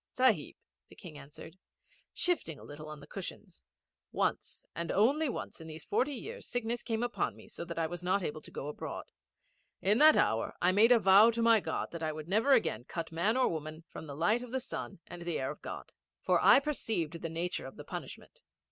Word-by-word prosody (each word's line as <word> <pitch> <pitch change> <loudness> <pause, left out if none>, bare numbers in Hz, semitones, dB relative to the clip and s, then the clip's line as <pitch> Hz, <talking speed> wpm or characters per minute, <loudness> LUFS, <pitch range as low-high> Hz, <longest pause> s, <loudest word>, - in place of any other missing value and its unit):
'Sahib,' 255 -4 +2 0.3
the - - -15
King 170 -6 -11
answered, 145 +5 -12 0.5
shifting 345 - -1
a - - -13
little 150 +1 -9
on 150 -1 -8
the - - -11
cushions, - - -8 0.5
'once - - -2
and 170 0 -3
only 275 +9 +3
once 210 - -6
in 160 - -9
these 155 -1 -8
forty 270 +7 0
years 460 - -7
sickness 240 -1 -2
came 225 0 -2
upon 245 - -1
me - - -14
so 210 - -7
that 170 -1 -7
I 165 - +1
was 175 +2 -6
not 185 +2 +1
able 155 -1 -4
to - - -12
go 140 - -6
abroad. 150 - -6 0.7
In 205 +5 +2
that 310 +1 +8
hour 110 0 +1
I 180 - +4
made 215 +5 +5
a 245 - +8
vow 200 +1 +7
to 230 0 0
my 230 -1 +6
God - - -3
that 170 - -6
I 155 -1 -1
would 155 0 -7
never 220 +9 +3
again 125 - +2
cut 165 +2 -5
man 195 +9 +1
or 260 - +4
woman 155 0 -5
from 160 - -9
the 140 - -7
light 210 +9 +2
of 250 -1 -8
the 260 - 0
sun 200 -6 -6
and 175 0 -9
the 170 -1 -2
air 130 +1 -2
of 150 - -11
God; - - -7 0.3
for - - +2
I - - +8
perceived 220 - -2
the 165 - -3
nature 170 +3 -3
of - - -11
the - - -9
punishment. - - -8
180 Hz, 220 wpm, -32 LUFS, 160-235 Hz, 0.7 s, that